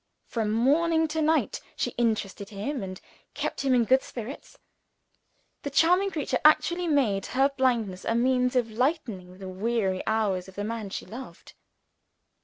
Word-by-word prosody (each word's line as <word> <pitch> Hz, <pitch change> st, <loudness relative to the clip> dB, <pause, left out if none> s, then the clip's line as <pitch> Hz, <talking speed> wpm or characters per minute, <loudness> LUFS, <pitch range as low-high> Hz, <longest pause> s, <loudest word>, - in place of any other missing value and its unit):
From 225 Hz, -3 st, -2 dB
morning 320 Hz, +8 st, +3 dB
to 315 Hz, +1 st, -1 dB
night, 315 Hz, +1 st, +1 dB
she -, -, -1 dB
interested 215 Hz, -4 st, -1 dB
him, 225 Hz, +6 st, -4 dB
and 185 Hz, -1 st, -6 dB, 0.4 s
kept -, -, -3 dB
him 270 Hz, -2 st, +3 dB
in 240 Hz, -2 st, +3 dB
good 260 Hz, +3 st, +4 dB
spirits. 240 Hz, +4 st, -8 dB, 1.0 s
The 285 Hz, -, -4 dB
charming 345 Hz, +7 st, +4 dB
creature 290 Hz, -7 st, -1 dB
actually 345 Hz, +3 st, +4 dB
made 235 Hz, -11 st, +1 dB
her 270 Hz, +2 st, +2 dB
blindness 240 Hz, -9 st, 0 dB
a 230 Hz, -, 0 dB
means 250 Hz, +1 st, +2 dB
of 240 Hz, -3 st, +1 dB
lightening 220 Hz, -, -2 dB
the 190 Hz, -1 st, -8 dB
weary 190 Hz, 0 st, -1 dB
hours 205 Hz, -5 st, 0 dB
of 190 Hz, -, -13 dB
the 205 Hz, -, -3 dB
man 220 Hz, -1 st, -4 dB
she -, -, -5 dB
loved. 255 Hz, +4 st, -10 dB
240 Hz, 155 wpm, -27 LUFS, 205-280 Hz, 1.0 s, good